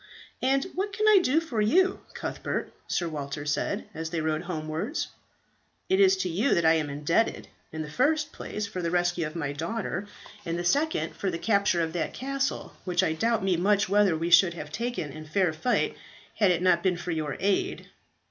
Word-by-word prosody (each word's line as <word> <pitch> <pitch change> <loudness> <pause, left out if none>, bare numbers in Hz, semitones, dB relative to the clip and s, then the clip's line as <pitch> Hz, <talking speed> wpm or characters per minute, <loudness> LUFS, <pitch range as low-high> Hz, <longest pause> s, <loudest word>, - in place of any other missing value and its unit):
"And 270 +1 +2
what 395 +2 -2
can 430 +2 +1
I 425 -2 +8
do 305 -1 +3
for 275 -10 -2
you, 370 - +3 0.2
Cuthbert?" - - -4
Sir 175 - 0
Walter 145 -2 -5
said, 150 - -1
as 160 0 -4
they 165 0 -2
rode 155 0 0
homewards. 170 - -3 0.8
"It 380 +1 +3
is 385 -1 +6
to - - -1
you 200 +11 +2
that 170 - +1
I 160 - +6
am 155 -2 0
indebted: 150 +10 0 0.2
in 155 0 -4
the - - -7
first 300 - +1
place 210 - -5
for 185 -2 -5
the 170 - -1
rescue 175 -1 +1
of 155 - -10
my 145 -4 -2
daughter, 185 +5 -3 0.4
in 170 -2 -2
the 175 - -2
second 290 - +1
for 195 - -2
the 170 - -2
capture 200 -2 +2
of 160 0 -3
that 160 -4 -2
castle, 275 +1 -2
which 180 0 +1
I 160 - +1
doubt 225 +5 +1
me 190 -3 +2
much 200 +3 +2
whether 200 -4 +4
we 170 +2 -2
should 170 0 +7
ever 170 - -6
have 150 - -14
taken 235 - -3
in 155 +2 -9
fair 175 +1 +1
fight 240 +11 0 0.4
had 205 -3 +4
it 180 0 +1
not 175 -2 +4
been 180 -2 +1
for 175 0 -4
your 155 -3 -2
aid." 200 0 0
180 Hz, 205 wpm, -27 LUFS, 160-230 Hz, 0.8 s, I